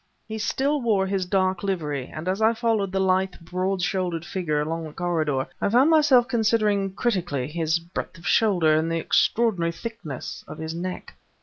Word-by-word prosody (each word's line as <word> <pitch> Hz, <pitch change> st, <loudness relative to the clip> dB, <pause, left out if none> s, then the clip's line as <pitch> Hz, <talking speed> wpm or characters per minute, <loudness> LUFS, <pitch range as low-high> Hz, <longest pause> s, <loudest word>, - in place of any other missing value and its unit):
He 220 Hz, 0 st, -5 dB
still 275 Hz, +7 st, 0 dB
wore 210 Hz, -5 st, +2 dB
his 190 Hz, -1 st, -1 dB
dark 185 Hz, 0 st, +1 dB
livery, 150 Hz, -9 st, -2 dB
and 155 Hz, +3 st, -7 dB
as 190 Hz, +3 st, -1 dB
I 225 Hz, +1 st, +4 dB
followed 225 Hz, -4 st, 0 dB
the 190 Hz, -, 0 dB
lithe, 190 Hz, 0 st, +2 dB
broad 185 Hz, +2 st, -2 dB
shouldered 180 Hz, -3 st, -1 dB
figure 175 Hz, -6 st, -1 dB
along 160 Hz, +2 st, -2 dB
the 155 Hz, -, -9 dB
corridor, 155 Hz, -6 st, 0 dB, 0.2 s
I -, -, +2 dB
found 255 Hz, +8 st, +4 dB
myself 290 Hz, -6 st, +5 dB
considering 215 Hz, -5 st, +1 dB
critically 175 Hz, -, -1 dB
his 160 Hz, +1 st, 0 dB
breadth 170 Hz, +1 st, -6 dB
of 165 Hz, -, -15 dB
shoulder 180 Hz, -8 st, +3 dB
and 160 Hz, +2 st, +1 dB
the 165 Hz, -, 0 dB
extraordinary 185 Hz, 0 st, +2 dB
thickness 185 Hz, -, -7 dB
of -, -, -8 dB
his 160 Hz, 0 st, -5 dB
neck. 180 Hz, +2 st, -5 dB
185 Hz, 180 wpm, -24 LUFS, 165-215 Hz, 0.2 s, myself